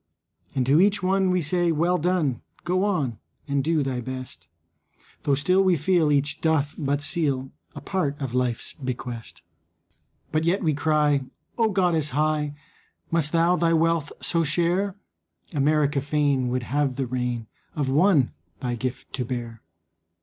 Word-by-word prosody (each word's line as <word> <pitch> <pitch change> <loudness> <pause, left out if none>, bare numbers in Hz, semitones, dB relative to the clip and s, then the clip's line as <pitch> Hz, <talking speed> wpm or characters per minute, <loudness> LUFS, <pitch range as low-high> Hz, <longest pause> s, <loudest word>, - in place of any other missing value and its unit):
And 130 -2 +1
to 145 +6 +5
each 205 0 +2
one 190 0 +2
we 180 -2 +1
say, 175 +2 +1
"Well 170 +3 +1
done, 160 -6 0 0.2
Go 185 +2 +1
on 145 - 0 0.3
and 140 -1 0
do 160 0 +1
thy 130 -2 -2
best." 130 -8 -7 0.7
Though 140 - +2
still 185 +7 +3
we 185 -2 +4
feel 160 0 +2
each 145 +1 0
doth 155 -3 +1
but 145 -2 -1
seal 145 -5 0 0.2
A - - -7
part 150 -7 -2
of 135 -4 -4
life's 125 -2 -1
bequest. 120 - -6 0.9
But 155 0 +1
yet 180 +5 +1
we 155 -2 +2
cry, 150 -2 +2 0.3
"O 225 -2 +2
goddess 170 -7 +1
high, 150 -1 +1 0.6
Must 160 -3 +1
thou 170 +1 +3
thy 165 -1 +2
wealth 165 -2 +2
so 170 -1 +1
share? 175 +5 +1 0.6
America 145 -1 +2
feign 145 -3 +1
would 125 0 -1
have 140 +1 0
the 135 - -1
reign 125 -2 -2 0.3
Of 145 -4 -1
one 150 -3 +4 0.3
thy 125 -2 -2
gift 125 +2 -5
to 130 - -1
bear. 120 -2 -5
150 Hz, 155 wpm, -25 LUFS, 130-170 Hz, 0.9 s, to